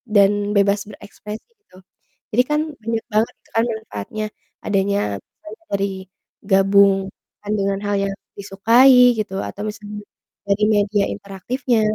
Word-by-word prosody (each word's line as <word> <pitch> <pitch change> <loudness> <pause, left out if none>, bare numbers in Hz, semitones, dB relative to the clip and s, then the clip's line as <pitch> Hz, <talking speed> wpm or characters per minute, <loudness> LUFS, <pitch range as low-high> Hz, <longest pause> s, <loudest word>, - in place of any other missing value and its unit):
dan 200 -1 +7 0.3
bebas 200 0 +3
berekspresi 210 - -10 0.2
tuh. 185 - -17 0.5
Jadi 235 - +4
kan 300 0 +2 0.2
banyak 225 0 -2
banget 215 +2 +2
gitu - - -28
kan 225 - +4
manfaatnya 215 - -6 0.4
adany 200 -1 +1 0.2
misalnya 210 - -14
dari 200 0 +1 0.6
gabungkan 195 0 +2
dengan 195 0 0
hal 205 0 0
yang 195 - -2 0.2
disukai 240 +5 +5
gitu 210 -3 -3
atau 205 - -6
misalnya 210 -1 -7 0.4
dari 200 +1 +1
media 205 -1 +2
interaktifnya. 225 +5 -2
205 Hz, 125 wpm, -20 LUFS, 195-220 Hz, 0.6 s, dan